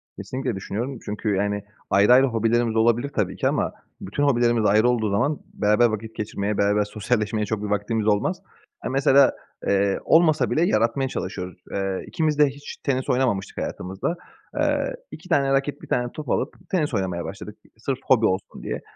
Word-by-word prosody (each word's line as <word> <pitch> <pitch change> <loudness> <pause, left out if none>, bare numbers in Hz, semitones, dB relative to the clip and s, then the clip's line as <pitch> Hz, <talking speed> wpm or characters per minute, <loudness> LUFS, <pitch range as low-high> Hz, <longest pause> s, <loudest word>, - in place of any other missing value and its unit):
Kesinlikle 130 -3 -4
düşünüyorum 115 +7 -4
çünkü, 105 0 -1
yani, 105 +1 -1 0.3
ayrı 100 +4 +5
ayrı 130 +2 +7
hobilerimiz 115 0 +1
olabilir 120 +4 +2
tabii 95 -4 0
ki - - 0
ama - - 0 0.3
bütün 100 +10 -2
hobilerimiz 120 -5 +3
ayrı 110 +4 +4
olduğu 115 -3 +1
zaman 140 +9 +1
beraber 105 +3 +3
vakit 110 0 -2
geçirmeye, 105 -1 -2
beraber 105 +1 +3
sosyalleşmeye 105 0 -1
çok 105 0 -3
bir - - -2
vaktimiz 105 +2 -1
olmaz. 110 - +1 0.4
E, - - -1
mesela, 135 0 +5 0.4
eee, 100 0 +2
olmasa 160 -2 +4
bile 155 - +2
yaratmaya 115 +2 +1
çalışıyoruz. 90 -4 -5
Eee, 95 -1 -2
ikimiz 155 -2 0
de 150 - +7
hiç 145 +1 -8
tenis 130 -2 -2
oynamamıştık 120 -7 0
hayatımızda. 95 - -3 0.4
Eee, - - +1 0.2
2 180 - -11
tane 140 -4 +3
raket 135 +1 0
1 - - -11
tane 125 0 0
top 150 -4 -7
alıp 130 - 0 0.2
tenis 155 -7 0
oynamaya 95 -4 -1
başladık 105 +2 -8 0.2
sırf 130 +3 -3
hobi 115 -4 +4
olsun 95 0 -2
diye. - - -4
115 Hz, 170 wpm, -24 LUFS, 105-135 Hz, 0.4 s, ayrı